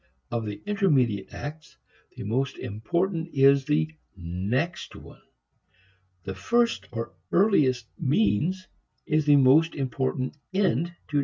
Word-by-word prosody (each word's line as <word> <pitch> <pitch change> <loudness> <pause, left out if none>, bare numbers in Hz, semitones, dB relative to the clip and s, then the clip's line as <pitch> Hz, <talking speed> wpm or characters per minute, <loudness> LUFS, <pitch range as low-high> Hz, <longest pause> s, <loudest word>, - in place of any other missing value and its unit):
Of 115 -2 -2
the 105 +9 -7
intermediate 150 - +1
acts, 150 +1 -8 0.4
the - - -6
most 130 +6 -1
important 170 - -2
is 135 0 +5
the 155 +2 +1 0.2
next 100 - -3
one. - - -13 1.0
The 95 - -5
first 235 - 0
or 115 -4 -5 0.2
earliest 145 - +3
means 150 - +1 0.4
is 155 -1 +1
the 145 - +7
most 145 +5 +5
important 130 0 -2 0.2
end 170 - +2
to - - -13
discover. 150 -3 -3
140 Hz, 125 wpm, -26 LUFS, 120-170 Hz, 1.0 s, the